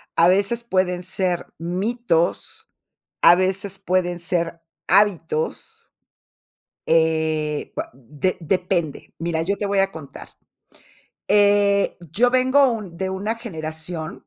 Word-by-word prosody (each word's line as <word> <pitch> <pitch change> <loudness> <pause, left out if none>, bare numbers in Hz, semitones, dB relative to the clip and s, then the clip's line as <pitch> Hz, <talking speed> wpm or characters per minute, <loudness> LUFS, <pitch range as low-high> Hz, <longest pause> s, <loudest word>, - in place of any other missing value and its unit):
a 170 - +5
veces 200 +6 +2
pueden 185 -4 0
ser 180 -1 -2
mitos, 180 0 -1 0.5
a 170 - +9
veces 190 +2 -1
pueden 180 -2 0
ser 170 -1 -2 0.3
hábitos. 180 -5 0 1.0
Eh, 160 -2 +1
va - - -3
de 145 +8 -3
depende. 175 -2 -2
Mira, 165 -1 -1
yo 200 +4 0
te 205 - -2
voy 200 -1 +1
a 195 0 +2
contar, 155 -6 -10 1.0
eh, 205 0 +3
yo 240 +8 +3
vengo 260 +1 +4
un 200 -7 -5
de 190 - -2
una 200 +4 -3
generación, 160 -6 -6
185 Hz, 115 wpm, -22 LUFS, 165-200 Hz, 1.0 s, a